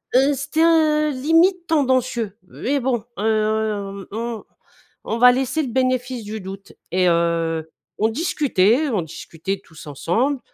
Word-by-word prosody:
heu, 275 Hz, +3 st, +5 dB
c'était, 285 Hz, +4 st, 0 dB
heu, 310 Hz, -2 st, +4 dB
limite 330 Hz, +6 st, +2 dB
tendancieux, 255 Hz, -, 0 dB
mais 280 Hz, +2 st, -2 dB
bon, 240 Hz, -4 st, -1 dB, 0.2 s
heu, 215 Hz, -2 st, -1 dB
on 230 Hz, +1 st, -4 dB, 0.6 s
on 225 Hz, -, -2 dB
va 250 Hz, 0 st, +8 dB
laisser 265 Hz, +4 st, 0 dB
le 255 Hz, -, -4 dB
bénéfice 255 Hz, -1 st, -1 dB
du 215 Hz, +1 st, -5 dB
doute, 195 Hz, +1 st, -9 dB, 0.2 s
et 180 Hz, 0 st, +3 dB
heu, 165 Hz, -1 st, 0 dB, 0.3 s
on 220 Hz, -, +3 dB
discutait, 275 Hz, -, +2 dB
on 210 Hz, -8 st, 0 dB
discutait 165 Hz, +4 st, -6 dB
tous 160 Hz, -1 st, -14 dB
ensemble, 230 Hz, -, 0 dB
235 Hz, 135 wpm, -21 LUFS, 195-280 Hz, 0.6 s, va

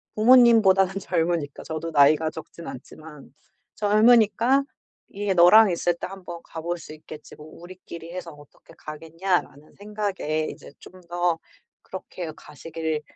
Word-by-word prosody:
부모님보다는 215 Hz, -5 st, +5 dB
젊으니까. 165 Hz, -5 st, -2 dB
저도 160 Hz, +1 st, -5 dB
나이가 150 Hz, +1 st, +4 dB
적진 165 Hz, +1 st, -11 dB
않지만. 150 Hz, +3 st, -12 dB, 0.4 s
젊으니까 225 Hz, +4 st, +3 dB, 0.5 s
이게 200 Hz, 0 st, -2 dB
'너랑 195 Hz, +5 st, +7 dB
있을 175 Hz, 0 st, 0 dB
때 -, -, -6 dB
한번 180 Hz, -3 st, -9 dB
가 165 Hz, -, -9 dB
볼 175 Hz, +2 st, -3 dB
수 155 Hz, -, -12 dB
있겠지 155 Hz, 0 st, -12 dB
뭐 150 Hz, -, -13 dB
우리끼리 170 Hz, 0 st, -11 dB
해서 180 Hz, -2 st, -7 dB
어떻게 145 Hz, -1 st, -19 dB
가겠냐.'라는 165 Hz, -1 st, -4 dB
생각에 200 Hz, -7 st, -3 dB
이제 -, -, -12 dB
좀 185 Hz, -, -15 dB
더 175 Hz, -1 st, 0 dB, 0.5 s
그렇게 180 Hz, -3 st, -8 dB
가시길 160 Hz, +1 st, -5 dB
175 Hz, 305 characters per minute, -24 LUFS, 155-195 Hz, 0.5 s, 너랑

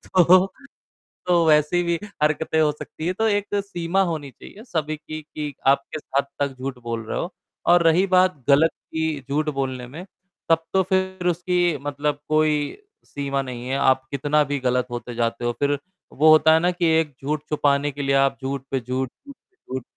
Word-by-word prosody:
तो 180 Hz, +1 st, +6 dB, 0.8 s
तो 175 Hz, -2 st, +4 dB
वैसी 150 Hz, +3 st, +4 dB
भी 170 Hz, 0 st, 0 dB, 0.3 s
हरकतें 155 Hz, +1 st, +1 dB
हो 150 Hz, -1 st, +3 dB
सकती 150 Hz, +1 st, -8 dB
हैं। 180 Hz, -, 0 dB
तो 225 Hz, -, +3 dB
एक 205 Hz, -1 st, 0 dB
सीमा 175 Hz, -1 st, -1 dB
होनी 155 Hz, -4 st, -4 dB
चाहिए 205 Hz, -, -13 dB
सभी 155 Hz, -, -2 dB
की 155 Hz, +1 st, -8 dB
कि 150 Hz, -1 st, -6 dB
आप 140 Hz, 0 st, +4 dB
किस 155 Hz, -, -4 dB, 0.2 s
हद 140 Hz, -, +2 dB
तक 140 Hz, -2 st, -1 dB
झूठ 135 Hz, 0 st, -4 dB
बोल 115 Hz, -1 st, -4 dB
रहे -, -, -3 dB
हो। 175 Hz, -, -4 dB, 0.4 s
और 175 Hz, 0 st, +6 dB
रही 165 Hz, +3 st, +4 dB
बात 185 Hz, -2 st, +4 dB
ग़लत 150 Hz, +4 st, +5 dB
की 160 Hz, -2 st, -4 dB
झूठ 150 Hz, +2 st, 0 dB
बोलने 130 Hz, -3 st, -3 dB
में, 160 Hz, +8 st, -9 dB, 0.4 s
तब 165 Hz, 0 st, +3 dB
तो 190 Hz, -, +4 dB
फ़िर 190 Hz, -1 st, -1 dB
उसकी 175 Hz, -1 st, +1 dB
मतलब 145 Hz, 0 st, -2 dB
कोई 155 Hz, 0 st, +3 dB, 0.5 s
सीमा 140 Hz, -1 st, -2 dB
नहीं 125 Hz, -2 st, -7 dB
है, 135 Hz, -, 0 dB
आप 130 Hz, -1 st, +2 dB
कितना 145 Hz, +2 st, +2 dB
भी 145 Hz, -, 0 dB
ग़लत 125 Hz, -1 st, 0 dB
होते 120 Hz, 0 st, -6 dB
जाते 115 Hz, 0 st, -1 dB
हो। 120 Hz, -, +1 dB
फ़िर 145 Hz, 0 st, +1 dB, 0.4 s
वो 155 Hz, +3 st, +4 dB
होता 155 Hz, 0 st, +6 dB
है 160 Hz, -, +5 dB
ना 175 Hz, +2 st, +2 dB
कि 175 Hz, -1 st, -1 dB
एक 155 Hz, -3 st, -2 dB
झूठ 150 Hz, +1 st, -2 dB
छुपाने 145 Hz, -1 st, +1 dB
के 145 Hz, +1 st, -6 dB
लिए 135 Hz, 0 st, +2 dB
आप 135 Hz, 0 st, +3 dB
झूठ 135 Hz, 0 st, -3 dB
पे 135 Hz, -, +1 dB
झूठ 130 Hz, +1 st, -3 dB
झूठ 280 Hz, -, -16 dB
पे 375 Hz, -, -47 dB, 0.2 s
झूठ 130 Hz, -1 st, -3 dB
150 Hz, 200 wpm, -23 LUFS, 135-170 Hz, 0.8 s, तो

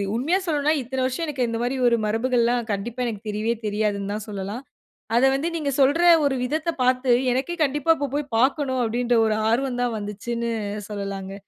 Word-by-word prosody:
உண்மையா 310 Hz, +11 st, +1 dB
சொல்லனும்னா, 300 Hz, 0 st, +2 dB
இத்தன 260 Hz, +1 st, -3 dB
வருஷம் 260 Hz, +6 st, -2 dB
எனக்கு 265 Hz, -5 st, -1 dB
இந்த 230 Hz, 0 st, -2 dB
மாதிரி 250 Hz, +2 st, -1 dB
ஒரு 235 Hz, -, +2 dB
மரபுகள்லாம் 235 Hz, +1 st, +1 dB
கண்டிப்பா 235 Hz, +5 st, -3 dB
எனக்கு 215 Hz, -1 st, -5 dB
தெரியவே 215 Hz, +2 st, -1 dB
தெரியாதுன்னு 205 Hz, -1 st, -1 dB
தான் 210 Hz, 0 st, -5 dB
சொல்லலாம். 205 Hz, +5 st, -5 dB, 0.5 s
அத 240 Hz, -, +4 dB
வந்து 295 Hz, +5 st, -1 dB
நீங்க 285 Hz, -3 st, -1 dB
சொல்ற 290 Hz, +6 st, +4 dB, 0.2 s
ஒரு 275 Hz, -2 st, +1 dB
விதத்த 310 Hz, +5 st, -2 dB
பார்த்து, 255 Hz, 0 st, +2 dB, 0.2 s
எனக்கே 315 Hz, +7 st, -2 dB
கண்டிப்பா 295 Hz, +2 st, +1 dB
இப்ப 285 Hz, -2 st, -2 dB
போய் 290 Hz, -3 st, -3 dB
பார்க்கனும் 260 Hz, 0 st, +1 dB
அப்டின்ற, 240 Hz, +1 st, +1 dB
ஒரு 215 Hz, -1 st, +1 dB
ஆர்வம் 245 Hz, +1 st, 0 dB
தான் 240 Hz, -2 st, -1 dB
வந்துச்சுன்னு 235 Hz, +3 st, -4 dB, 0.4 s
சொல்லலாங்க. 195 Hz, -1 st, -5 dB
245 Hz, 175 wpm, -23 LUFS, 220-275 Hz, 0.5 s, அத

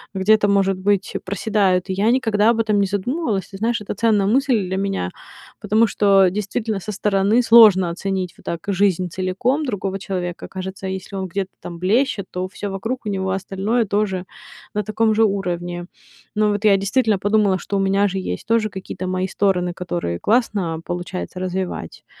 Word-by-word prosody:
где-то, 205 Hz, +2 st, +3 dB
может 195 Hz, -1 st, +2 dB
быть, 200 Hz, 0 st, 0 dB
проседают. 195 Hz, -1 st, +1 dB
И -, -, 0 dB
я 205 Hz, +4 st, +2 dB
никогда 225 Hz, -4 st, +2 dB
об 230 Hz, -, -1 dB
этом 215 Hz, -2 st, +2 dB
не 200 Hz, -, +2 dB
задумывалась. 205 Hz, -, -2 dB
Ты 195 Hz, -, -9 dB
знаешь, 230 Hz, +2 st, 0 dB
это 205 Hz, -, -4 dB
ценная 215 Hz, -2 st, +2 dB
мысль 240 Hz, -3 st, +2 dB
для 190 Hz, +1 st, -2 dB
меня. 195 Hz, -, -2 dB, 0.5 s
Потому 220 Hz, +2 st, +3 dB
что 195 Hz, -2 st, +4 dB
действительно 210 Hz, +2 st, -2 dB
со 195 Hz, +3 st, -6 dB
стороны 205 Hz, +3 st, +2 dB
сложно 215 Hz, -6 st, +7 dB
оценить, 185 Hz, 0 st, -3 dB
вот -, -, -20 dB
так 170 Hz, -, -3 dB
жизнь 190 Hz, -2 st, +1 dB
целиком 190 Hz, -, -1 dB
другого 195 Hz, -5 st, -3 dB
человека. 180 Hz, -3 st, -4 dB
Кажется, 190 Hz, 0 st, -6 dB
если 190 Hz, +1 st, -5 dB
он 190 Hz, 0 st, -3 dB
где-то 190 Hz, +1 st, -3 dB
там 170 Hz, -, -7 dB
блещет, 205 Hz, +2 st, +1 dB
то 185 Hz, +1 st, -3 dB
всё 200 Hz, +1 st, -6 dB
вокруг 225 Hz, +7 st, -3 dB
у 210 Hz, -, -2 dB
него 190 Hz, -1 st, -2 dB
остальное 195 Hz, +5 st, -1 dB
тоже 195 Hz, -2 st, -1 dB, 0.5 s
на 210 Hz, 0 st, -1 dB
таком 215 Hz, +2 st, +1 dB
же 225 Hz, -, +4 dB
уровне. 175 Hz, -3 st, -2 dB, 0.5 s
Но 210 Hz, 0 st, +3 dB
вот 205 Hz, +1 st, -1 dB
я 200 Hz, -2 st, +6 dB
действительно 205 Hz, +1 st, +1 dB
подумала, 205 Hz, -2 st, +2 dB
что 200 Hz, -, -3 dB
у -, -, +1 dB
меня 195 Hz, +1 st, +2 dB
же 195 Hz, -, -3 dB
есть 185 Hz, -, -5 dB
тоже 225 Hz, -1 st, +2 dB
какие-то 185 Hz, -1 st, -6 dB
мои 185 Hz, 0 st, -1 dB
стороны, 180 Hz, -2 st, 0 dB
которые 170 Hz, -, -3 dB
классно 205 Hz, -8 st, 0 dB
получается 175 Hz, +1 st, -5 dB
развивать. 185 Hz, -, -4 dB
195 Hz, 180 wpm, -21 LUFS, 185-215 Hz, 0.5 s, сложно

